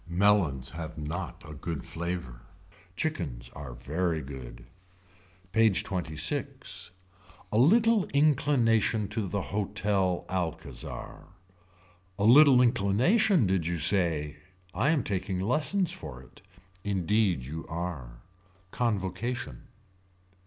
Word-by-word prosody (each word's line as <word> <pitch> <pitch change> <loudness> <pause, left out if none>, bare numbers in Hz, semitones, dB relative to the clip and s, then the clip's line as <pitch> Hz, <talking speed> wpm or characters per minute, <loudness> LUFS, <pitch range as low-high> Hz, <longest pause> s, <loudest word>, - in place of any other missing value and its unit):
Melons 85 -8 +2
have 80 -1 -7
not 80 0 -5
a 75 - -8
good 80 +1 -5
flavor. 85 -8 -4 0.5
Chickens - - -3
are 65 -4 -8
very 80 +6 -2
good. 65 -3 -9 0.9
PAGE 110 -2 +3
XXVI. 80 -4 -3 0.6
A 105 - +1
little 220 - +5
inclination 130 -7 +2
to 110 -3 -2
the 100 +1 -2
hotel 100 -3 0
Alcazar. 80 -11 -5 0.9
A 100 - -1
little 130 +2 +7
inclination 125 - +3
did 90 -4 +1
you 85 0 -1
say 80 -3 +1 0.4
I 120 - +1
am 155 -6 +2
taking 95 -1 -2
lessons 150 - +1
for 65 +1 -8
it. 65 - -19 0.4
Indeed 100 - +1
you 80 +5 -6
are. 75 -9 -5 0.5
Convocation. 120 +5 -2
95 Hz, 105 wpm, -29 LUFS, 80-115 Hz, 0.9 s, little